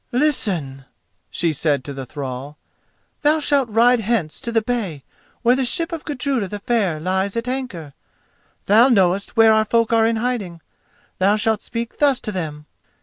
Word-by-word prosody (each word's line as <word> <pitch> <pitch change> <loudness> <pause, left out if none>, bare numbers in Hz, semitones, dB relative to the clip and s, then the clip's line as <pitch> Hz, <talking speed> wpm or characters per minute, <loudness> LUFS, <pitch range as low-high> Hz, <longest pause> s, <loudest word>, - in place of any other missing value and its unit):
"Listen," 185 - -1 0.4
she 165 -2 -1
said 145 -2 0
to 140 - -6
the 135 -2 -7
thrall. 135 +2 -6 0.6
"Thou 300 +2 +3
shalt 280 -4 +1
ride 235 +3 +4
hence 210 -8 -1
to 235 -3 -4
the 225 -1 +1
bay 205 - -3 0.4
where 245 +1 +4
the 265 - 0
ship 330 +7 -1
of 330 -2 -6
Gudruda 270 -6 -2
the 205 - -5
Fair 200 -7 0
lies 190 +5 -1
at 230 +1 -3
anchor. 225 - -4 0.7
Thou 225 +6 +5
knowest 195 -1 +1
where 225 -1 +7
our 220 0 +3
folk 230 +1 +1
are 225 -1 +4
in 230 - +1
hiding. 220 -7 -3 0.6
Thou 195 +3 +4
shalt 215 0 0
speak 235 0 -6
thus 280 -3 +3
to 215 - -4
them. 155 -6 -5
220 Hz, 170 wpm, -20 LUFS, 170-245 Hz, 0.7 s, where